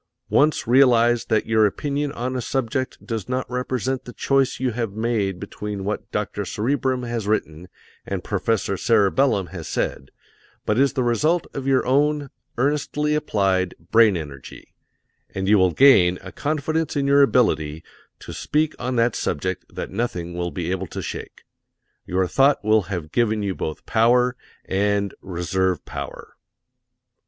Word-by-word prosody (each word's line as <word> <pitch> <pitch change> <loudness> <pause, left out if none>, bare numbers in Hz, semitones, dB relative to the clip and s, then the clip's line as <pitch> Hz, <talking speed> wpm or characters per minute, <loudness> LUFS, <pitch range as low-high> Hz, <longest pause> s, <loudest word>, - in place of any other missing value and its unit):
Once 150 +1 +3
realize 120 -2 +4
that 110 - +1
your 110 -1 +4
opinion 145 +6 -2
on 130 0 -3
a 125 - -1
subject 130 +1 -3
does 115 -2 -4
not 130 0 -1
represent 125 +1 -2
the 125 - -10
choice 135 -1 +1
you 130 -1 0
have 115 -3 -3
made 105 -4 -1
between 100 0 -6
what 105 +2 -4
Dr. - - -2
Cerebrum 130 +2 -1
has 120 -3 -3
written 90 -5 -2 0.4
and - - -4
Professor 105 -3 -1
Cerebellum 105 -1 +2
has 85 -4 -6
said, - - -3 0.6
but 105 +3 +1
is 140 0 +3
the 130 -3 0
result 155 +9 +1
of 135 -1 -5
your 135 -1 +3
own 145 +2 +1 0.3
earnestly 150 +3 0
applied 95 -10 0 0.2
brain 110 -4 +5
energy, 70 -5 -9 0.6
and 95 0 -2
you 105 0 +5
will 95 0 +4
gain 90 - +5
a - - -8
confidence 155 +2 -2
in 140 -1 0
your 140 +1 +5
ability 80 - +2 0.4
to - - -8
speak 155 +1 0
on 125 +1 -2
that 115 -1 +2
subject 95 +3 -2
that - - -6
nothing 90 -8 -3
will 85 0 -2
be 85 +2 -4
able 95 0 -2
to - - -6
shake. - - -7 0.6
Your 95 +1 +1
thought 135 +4 +2
will 110 0 +4
have 85 -6 -4
given 110 -1 +1
you 100 -1 -1
both 80 -3 -5
power 125 +3 +3 0.3
and 100 0 0
reserve 90 0 -1
power. - - -8
115 Hz, 155 wpm, -22 LUFS, 95-135 Hz, 0.6 s, brain